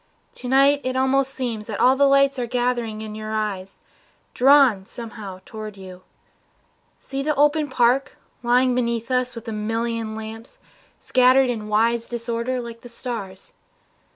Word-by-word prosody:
To 250 - -9
night 275 +2 +4
it 255 0 -2
almost 265 +1 +2
seems 235 -6 -4
That 215 -3 -5
all 255 +1 +5
the 280 +1 +4
lights 275 -1 +3
are 240 - -2
gathered 245 -1 0
in 215 0 -7
your 215 0 -6
eyes, 195 -3 -3 0.6
Drawn 255 -7 +5
somehow 215 -5 -9
toward 215 -2 -8
you. 185 -1 -11 1.0
See 270 0 -5
the 300 +1 0
open 295 +1 +2
park 255 +1 +1 0.2
Lying 250 +1 +3
below 235 -1 0 0.2
us 250 -1 -8
with 230 -1 -9
a - - -3
million 225 +1 -2
lamps 220 +2 -9 0.4
Scattered 255 0 +4
in 215 -3 -5
wise 230 +2 +1
disorder 235 +1 -3
like 235 -1 -8
the 245 - -12
stars. 225 -6 -7
235 Hz, 155 wpm, -22 LUFS, 220-260 Hz, 1.0 s, all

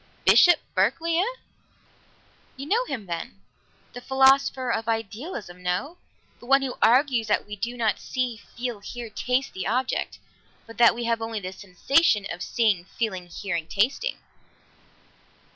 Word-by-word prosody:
"Bishop 350 -3 +7
Berkeley, 325 - +1
eh?" - - +4 1.3
"You 275 - -6
know 455 +10 +1
him, 240 - -5
then? 165 - -6 0.5
The 245 - -8
philosopher 265 -1 +3
of 225 -1 -2
Idealism 225 - -4
no? 180 - -2 0.4
the 240 - -14
one 275 +1 +4
who 260 -2 -3
argues 250 -2 +3
that 210 - +1
we 210 0 -7
do 235 +4 -4
not 220 -4 0
see, 250 -3 -3 0.2
feel, 240 -3 -3
hear, 235 +2 -8
taste 250 +5 -1
the 190 -1 -4
object, 255 +4 -1 0.5
but 230 +1 -13
that 235 - +6
we 240 - -4
have 230 -1 0
only 225 -1 -3
the 185 -1 -6
sensation 205 - +2
of 180 - -6
seeing, 210 -7 +1
feeling, 190 -5 -4
hearing, 170 -2 -4
tasting." 265 - 0
230 Hz, 145 wpm, -25 LUFS, 200-265 Hz, 1.3 s, Bishop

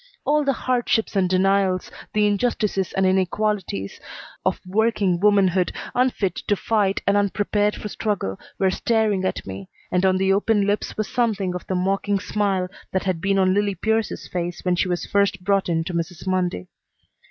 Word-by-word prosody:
All 300 +1 +3
the 275 -1 +2
hardships 240 -4 0
and 190 -2 +2
denials, 190 0 +2 0.2
the 210 0 +3
injustices 205 -2 0
and 190 - +2
inequalities, 190 - 0 0.4
of - - 0
working 200 -2 +1
womanhood, 195 -3 +3 0.2
unfit 245 -7 +1
to 205 - +3
fight 205 -2 0
and 200 - +3
unprepared 205 +1 +1
for - - -6
struggle, 200 - -2 0.2
were 190 -1 +2
staring 215 -3 +1
at - - -2
me, 95 0 -8 0.2
and 180 +1 +1
on 190 -1 +3
the 190 0 +2
open 205 0 +2
lips 205 +1 -1
was 215 -1 -1
something 215 -7 0
of 180 - -6
the 190 - -1
mocking 195 +2 0
smile 195 -2 0 0.2
that 190 - 0
had 185 -4 -1
been 195 +1 +1
on 185 -1 +3
Lillie 205 0 +1
Pierce's 220 +4 -1
face 175 0 -4
when 180 -1 +2
she 185 - +1
was 175 -1 -2
first 200 -2 +1
brought 195 -1 +1
in 165 -1 +1
to 175 - -5
Mrs. 170 +1 -4
Mundy. 180 - -1
195 Hz, 175 wpm, -23 LUFS, 185-210 Hz, 0.4 s, All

